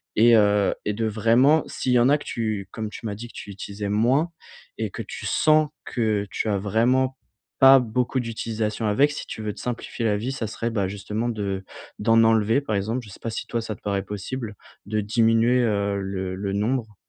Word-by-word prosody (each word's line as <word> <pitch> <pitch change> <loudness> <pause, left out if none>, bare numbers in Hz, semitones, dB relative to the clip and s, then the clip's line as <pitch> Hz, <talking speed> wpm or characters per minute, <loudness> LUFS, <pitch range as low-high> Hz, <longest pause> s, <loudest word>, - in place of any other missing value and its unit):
et 115 +2 +6
heu, 105 -1 +3
et 105 - 0
de 110 +1 -1
vraiment, 115 +8 +4
s'il 125 - -1
y 125 - +5
en 120 +3 +4
a 145 - +5
que 145 - -12
tu, 110 -4 -3
comme 110 -1 -4
tu 110 - -10
m'as 105 -2 -3
dit 120 +3 -8
que - - -16
tu - - -8
utilisais 100 +1 -6
moins, 125 +10 +2 0.5
et - - -3
que - - -6
tu - - -8
sens 155 -1 +3 0.2
que 110 -4 -1
tu 110 - -2
as 100 - +1
vraiment 125 +6 +1 0.4
pas 135 0 +9
beaucoup 125 +2 -1
d'utilisation 110 -1 -3
avec, 140 +8 +3
si 145 - -6
tu - - -6
veux 105 -1 -3
te - - -13
simplifier 120 -1 -4
la 105 -2 +2
vie, 120 +6 -3
ça 115 -4 -3
serait, 115 +2 -3
bah, 100 -4 0
justement, 105 +4 -3
de 100 -4 -3 0.4
d'en 115 +1 +4
enlever, 110 +3 +3
par 110 -7 -2
exemple, 110 +5 -2
je 105 - -12
sais - - -12
pas 115 - -3
si - - -5
toi 115 - -2
ça 110 -1 -4
te - - -21
paraît 100 -1 -1
possible, 105 +3 -5 0.3
de 110 0 -1
diminuer, 115 +3 +3
heu, 100 -3 0
le 95 -1 -4
le 100 +1 -3
nombre? 110 +1 -1
110 Hz, 220 wpm, -24 LUFS, 105-120 Hz, 0.5 s, pas